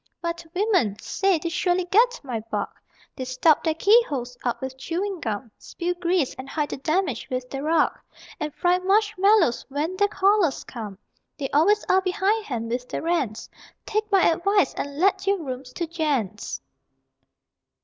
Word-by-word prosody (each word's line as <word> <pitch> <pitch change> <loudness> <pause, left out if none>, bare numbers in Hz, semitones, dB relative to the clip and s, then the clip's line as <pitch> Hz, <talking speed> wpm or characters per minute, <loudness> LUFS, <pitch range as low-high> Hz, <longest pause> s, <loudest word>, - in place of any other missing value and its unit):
But 340 0 -4
women! 365 - +2
Say, 385 - +1
they 335 +2 -3
surely 355 +1 +1
get 475 +7 +3
my 250 -5 -3
bug! - - -2 0.5
They 260 - -4
stop 255 +5 +3
their 320 -2 +1
keyholes 315 - +3
up 240 - -1
with 265 0 -5
chewing 360 +7 -3
gum, 225 -2 -4
Spill 350 +1 -3
grease, 350 -4 0
and 265 +1 -7
hide 300 -2 -1
the - - -4
damage 310 - -1
with 255 0 -3
the 270 - -4
rug, 315 +2 +3 0.5
And 300 0 -3
fry 355 +4 +2
marshmallows 395 - +3
when 300 +6 -2
their 405 +1 +4
callers 395 -6 +2
come. 215 -5 -7 0.4
They 275 -2 -4
always 400 +9 +3
are 375 - +4
behindhand 375 - -1
with 250 +1 -3
their - - -4
rents 285 -11 -1 0.4
Take 430 0 -2
my 390 -2 +5
advice 350 -1 +2
and 285 0 -5
let 385 +3 +2
your 395 0 +3
rooms 260 -5 -6
to 345 - -2
gents! 290 - -2
335 Hz, 160 wpm, -24 LUFS, 265-390 Hz, 0.5 s, my